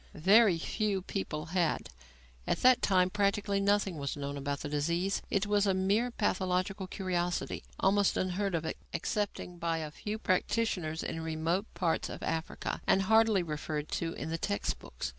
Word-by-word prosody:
Very 195 +3 +5
few 200 +2 -1
people 155 -6 -3
had. 175 -4 +1 0.6
At - - 0
that 255 -1 +6
time 185 -2 +3
practically 200 0 +1
nothing 200 -4 +1
was 140 0 -3
known 140 0 -4
about 140 0 -3
the - - -4
disease. 170 +6 0
It 200 +1 +1
was 205 0 +2
a 190 - +3
mere 200 +6 +2
pathological 190 -3 -1
curiosity, 180 -2 -2 0.2
almost 200 0 +3
unheard 185 +1 0
of 165 -1 -2 0.3
excepting 195 -4 -3
by 165 -1 0
a 155 -2 -4
few 210 +7 -4
practitioners 185 -5 0
in 165 - -4
remote 165 +5 -1
parts 170 -3 0
of - - -7
Africa, 165 0 -3
and 195 - +4
hardly 220 -2 +4
referred 150 -1 -4
to 165 0 -2
in 160 - -5
the 165 - -2
text 100 -7 -1
books. - - -6
185 Hz, 160 wpm, -31 LUFS, 160-200 Hz, 0.6 s, that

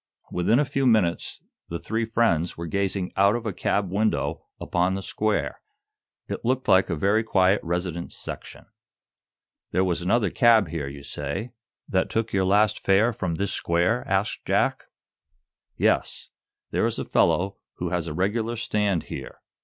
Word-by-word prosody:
Within 90 +7 +2
a 145 - +4
very 140 - -9
few 135 -1 +2
minutes 100 -8 +1 0.3
the 85 - -3
three 110 +6 -2
friends 110 -7 +1
were 85 - -5
gazing 95 +1 -1
out 100 +3 +4
of 120 -1 -4
a 105 - -2
cab 100 +1 -1
window 105 +3 -1
upon 90 +2 0
the 95 - -4
square. 100 - -1 0.7
It - - -5
looked 130 +2 0
like 95 0 +5
a 85 - 0
very 100 +8 +2
quiet 95 -2 +3
residence 85 0 -3
section. - - -7 1.0
"There 95 - +1
was 90 -2 0
another 100 +1 +2
cab 115 -7 +5
here, 75 -3 -3
you 70 0 -9
say, 75 - -4 0.4
that 95 -1 0
took 115 0 -2
your 95 -1 +2
last 105 +2 +3
'fare' 105 +5 +3
from 90 -5 -2
this 100 +3 -2
square?" 90 +8 +1
asked 95 +2 0
Jack. - - +1 0.9
"Yes; - - 0 0.4
there - - +2
is - - -2
a - - -3
fellow 95 +2 +2 0.2
who 90 - -3
has 85 -1 -1
a 75 - -4
regular 110 +6 0
stand 105 -5 0
here. 65 - -8
95 Hz, 165 wpm, -25 LUFS, 85-110 Hz, 1.0 s, like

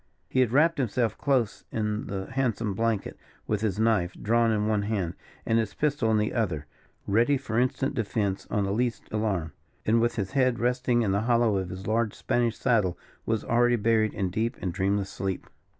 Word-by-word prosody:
He 130 - 0
had 125 -3 +3
wrapped 155 +4 +3
himself 120 -2 0
close 130 -7 0
in 105 -1 -2
the 95 -1 -5
handsome 115 -5 0
blanket, 115 0 -1 0.3
with 105 -2 -1
his 105 -4 0
knife 105 -6 +2
drawn 115 +2 +2
in 105 -1 +1
one 105 -1 +1
hand, 100 -5 -1 0.3
and 115 0 +2
his 110 -3 -2
pistol 145 -6 +1
in 110 - +3
the 105 0 0
other, 90 -10 -1 0.4
ready 120 +8 +3
for 120 -4 -2
instant 130 +2 0
defense 105 -5 -1
on 105 -2 0
the 100 - -1
least 120 +2 -1
alarm; 95 -8 -1 0.3
and, 115 +2 +3
with 120 0 +1
his 100 -4 -2
head 130 -3 +2
resting 125 0 +1
in 100 - +1
the 100 +1 +1
hollow 115 -4 +3
of 95 -2 -3
his 95 +2 -7
large 110 0 0
Spanish 120 -2 0
saddle, 105 -9 +1 0.3
was 110 -1 0
already 120 +1 +3
buried 110 -1 +2
in 95 -2 -1
deep 115 +6 -1
and 90 -2 -3
dreamless 100 +1 0
sleep. 95 -2 -3
110 Hz, 195 wpm, -27 LUFS, 100-120 Hz, 0.4 s, had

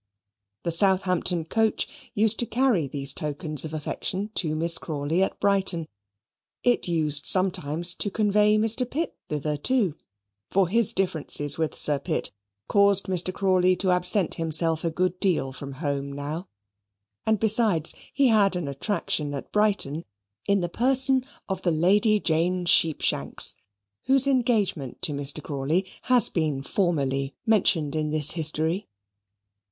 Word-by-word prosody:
The 170 - -2
Southampton 180 -1 +1
coach 220 +6 -2
used 215 +1 +2
to 240 - -1
carry 235 - +1
these 140 0 +1
tokens 150 0 -3
of 160 - -6
affection 185 +6 -4
to 155 -7 -1
Miss 165 +1 +4
Crawley 155 +3 -2
at 190 - -1
Brighton: 190 -5 0 0.8
it 245 -5 +1
used 155 -4 +1
sometimes 175 -2 +2
to 205 - -3
convey 210 0 +2
Mr. 225 +3 0
Pitt 325 +6 -4
thither 150 0 -3
too: 210 - +1 0.6
for 190 -1 +1
his 230 +1 +3
differences 155 -5 0
with 160 -1 -2
Sir 145 -2 +1
Pitt - - -3 0.4
caused 200 -1 +3
Mr. 185 -1 -1
Crawley 185 -1 +1
to 185 +1 0
absent 180 +1 +2
himself 160 0 +1
a 165 - 0
good 180 +2 -2
deal 170 -8 0
from 140 +1 -8
home 140 -1 -4
now: 150 +6 -6 0.8
and 220 -2 +2
besides, 215 -7 +2 0.2
he 275 -2 +2
had 205 -4 +3
an 175 -5 -4
attraction 150 0 -3
at 140 - -8
Brighton 200 -8 0 0.4
in 200 -1 +2
the 175 - -2
person 260 +6 +3 0.2
of 190 - -4
the 180 - 0
Lady 205 +7 +2
Jane 175 +1 -1
Sheepshanks, 165 -3 +2 0.5
whose 270 0 +6
engagement 225 - -1
to 170 - 0
Mr. 145 +2 -1
Crawley 150 +6 -2 0.2
has 250 -4 +4
been 150 -5 -2
formerly 140 -7 -2
mentioned 170 - +1
in 155 -1 -2
this 150 -1 +3
history. 160 +3 -1
175 Hz, 140 wpm, -24 LUFS, 155-205 Hz, 0.8 s, whose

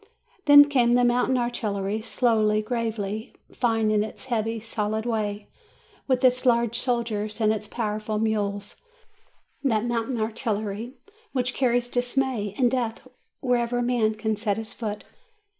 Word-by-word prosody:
Then 290 -1 +9
came 245 -4 +3
the 245 - +4
mountain 245 +1 +2
artillery, 215 -4 -2
slowly, 215 -3 +2
gravely, 220 -1 -3 0.2
fine 225 -3 +1
in 210 -1 +3
its 220 - -8
heavy, 225 -2 -1
solid 220 0 -2
way, 210 -3 -2 0.6
with 260 -1 +1
its 255 0 +3
large 235 -2 +2
soldiers, 230 -4 -1
and 215 -1 +3
its 215 -1 -5
powerful 215 -1 -3
mules 205 -2 -1 0.9
that 225 -5 +1
mountain 240 +1 -1
artillery 220 +1 -3 0.4
which 250 -2 0
carries 245 -2 +1
dismay 245 -4 -1
and 245 -3 +3
death 235 -2 -2 0.4
wherever 245 -1 +1
man 235 -3 +1
can 220 0 -1
set 210 -1 -1
his 225 -1 -6
foot. 210 -2 -5
225 Hz, 135 wpm, -25 LUFS, 215-245 Hz, 0.9 s, Then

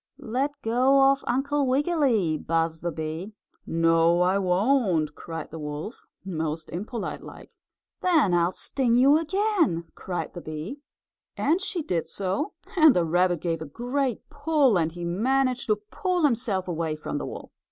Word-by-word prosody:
"Let 270 +6 -2
go 270 +4 +4
of 275 0 -2
Uncle 280 +2 +1
Wiggily!" 260 - +2
buzzed 165 +1 -1
the 175 - -2
bee. 160 +6 -5 0.3
"No 165 +1 +3
I 185 +2 +2
won't!" 185 - +2
cried 165 +1 -7
the 160 - -7
wolf, 150 - -6 0.2
most 160 -3 -3
impolite 210 +6 -5
like. - - -12 0.5
"Then 315 - +3
I'll 175 0 +3
sting 245 +4 0
you 275 +5 +6
again!" 330 - 0
cried 180 -2 -5
the 175 - -7
bee, 155 - -6 0.6
and 325 +7 +1
she 375 -4 -3
did 175 - -2
so, 200 - -2 0.2
and 315 -6 +7
the 175 - +2
rabbit 175 +1 +2
gave 165 -2 -2
a - - -4
great 245 - -2
pull, 290 -5 +2
and 165 -1 0
he 175 +1 -6
managed 255 +8 0
to 215 - +3
pull 345 - -2
himself 230 -9 +1
away 165 -2 -2
from 150 -1 -4
the - - -5
wolf. - - -8
205 Hz, 155 wpm, -26 LUFS, 165-275 Hz, 0.6 s, and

